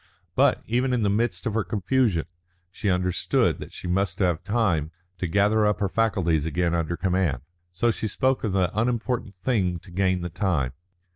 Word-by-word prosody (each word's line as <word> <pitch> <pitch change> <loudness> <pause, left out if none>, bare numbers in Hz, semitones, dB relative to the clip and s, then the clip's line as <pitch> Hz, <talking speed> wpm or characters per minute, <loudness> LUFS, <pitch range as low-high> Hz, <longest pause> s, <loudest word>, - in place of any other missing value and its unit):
But, - - +3
even 125 +3 +1
in 120 -3 +1
the 100 - +2
midst 105 -4 0
of 110 - -1
her 110 -1 +1
confusion, 100 -1 +1 0.5
she 100 - -2
understood 90 -1 +1
that - - -8
she - - -10
must 95 +2 0
have 90 -3 +1
time 100 -8 +1 0.3
to 90 - -1
gather 100 +5 +3
up 105 0 +2
her 100 - +1
faculties 95 -9 +1
again 85 +1 0
under 85 0 -1
command. 90 -9 0 0.3
So 115 +7 +1
she 110 - -3
spoke 130 +5 0
of 110 - 0
the 95 -2 0
unimportant 115 -2 -1
thing 95 -3 0
to 90 +2 -15
gain 95 0 +1
the 90 - -3
time. 85 -8 -1
95 Hz, 185 wpm, -25 LUFS, 90-110 Hz, 0.5 s, But